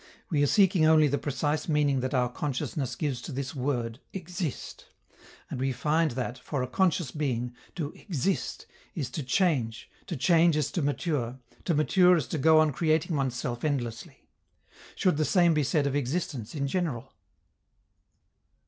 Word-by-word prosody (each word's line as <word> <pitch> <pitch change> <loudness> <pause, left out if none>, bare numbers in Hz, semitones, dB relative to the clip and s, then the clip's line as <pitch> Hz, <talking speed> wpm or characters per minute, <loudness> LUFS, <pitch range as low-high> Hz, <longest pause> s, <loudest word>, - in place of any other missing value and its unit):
We 150 -3 +2
are 145 - +4
seeking 190 -1 +4
only 155 -1 +6
the 145 0 0
precise 150 +3 -2
meaning 145 -3 +2
that 130 +2 -2
our 125 -1 +3
consciousness 135 +1 -3
gives 140 -6 -2
to - - -7
this 130 0 -4
word 125 -4 -2
"exist," 175 -4 -5 0.6
and - - -5
we 135 +1 0
find 155 +5 +1
that, 125 0 -4
for 135 -4 -3
a - - -3
conscious 175 -1 +1
being, 125 -5 -2 0.2
to 155 -5 -4
exist 185 - -2 0.3
is 135 -6 -3
to 155 - -3
change, 130 - 0 0.2
to 170 - -4
change 165 +3 +4
is 150 - 0
to 175 - -1
mature, 140 -4 -1 0.3
to 170 - +1
mature 180 +4 +5
is 150 - -1
to 160 - -2
go 160 +3 +5
on 155 -1 +4
creating 160 +3 +1
oneself 125 -3 -2
endlessly. 120 -7 -3 0.7
Should 180 -6 +2
the 155 - +2
same 175 +1 +4
be 155 - +2
said 145 +2 +1
of 140 0 0
existence 140 -3 -2
in 140 -2 -1
general? 135 -5 -2
145 Hz, 165 wpm, -28 LUFS, 130-160 Hz, 0.7 s, only